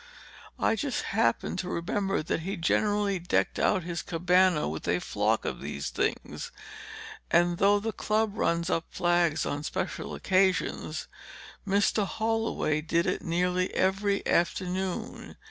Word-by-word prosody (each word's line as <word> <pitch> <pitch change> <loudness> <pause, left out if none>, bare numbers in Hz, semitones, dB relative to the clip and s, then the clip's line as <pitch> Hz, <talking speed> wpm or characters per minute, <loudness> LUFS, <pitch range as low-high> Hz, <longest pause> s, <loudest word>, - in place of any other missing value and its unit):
"I - - +2
just 260 +5 -2
happened 115 +9 0
to 180 - -3
remember 190 +1 -1
that 160 - -1
he 190 +5 -4
generally 205 +3 +1
decked 175 - 0
out 190 -4 +2
his 170 0 -3
cabana 180 -1 +2
with 80 +1 -5
a - - +2
flock - - 0
of - - -3
these 70 - -4
things. - - -2 0.8
And 175 0 +3
though 205 +1 +5
the 225 +2 -2
club 215 0 0
runs 170 -3 0
up 165 - 0
flags 175 -3 +1
on 145 - -2
special 185 +5 -4
occasions, 190 -1 0 0.6
Mr. 200 +1 +2
Holloway 225 -8 0
did 170 +2 +1
it - - -1
nearly 180 +2 0
every 200 +1 +1
afternoon. 185 +1 -1
185 Hz, 135 wpm, -28 LUFS, 170-200 Hz, 0.8 s, though